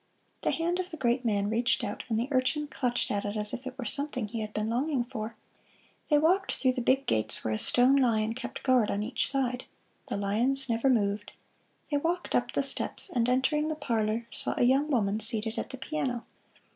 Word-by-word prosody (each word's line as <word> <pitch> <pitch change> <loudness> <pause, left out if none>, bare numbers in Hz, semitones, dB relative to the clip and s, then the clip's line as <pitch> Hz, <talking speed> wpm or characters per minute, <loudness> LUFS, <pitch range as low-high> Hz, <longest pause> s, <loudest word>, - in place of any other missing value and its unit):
The - - 0
hand 345 +2 -1
of 365 0 -3
the 320 - -8
great 250 -1 0
man 205 -3 0
reached 235 +3 +1
out, - - -5
and 220 -1 0
the 240 - -2
urchin 275 +3 +1
clutched 250 -4 -1
at 205 -1 -1
it 205 +1 -4
as 210 0 0
if 260 +2 -6
it 260 0 -8
were 255 - -5
something 275 -3 0
he 230 +2 -5
had 215 0 -5
been 215 0 -3
longing 255 +3 -1
for. 230 -2 -7 0.7
They 300 - +5
walked 365 +6 +2
through 260 - +2
the 255 0 -3
big 265 +3 +1
gates 110 -1 +4
where 110 - 0
a - - -1
stone 250 +2 +5
lion 225 -4 +1
kept 245 +1 -7
guard 255 -5 +3
on 205 +1 -1
each 230 - +1
side. 255 -2 -1 0.4
The - - -3
lions 240 +7 +1
never 230 +3 +1
moved. 205 -3 0 0.6
They 290 - +2
walked 340 +4 -2
up - - 0
the - - +1
steps, - - +3
and 240 -1 0
entering 300 +4 +1
the 310 - -2
parlor 230 -5 -2
saw - - 0
a - - +2
young 270 +4 +3
woman 215 -6 0
seated 220 0 +1
at - - -5
the 265 - -8
piano. 260 -4 -3
245 Hz, 215 wpm, -28 LUFS, 220-275 Hz, 0.7 s, They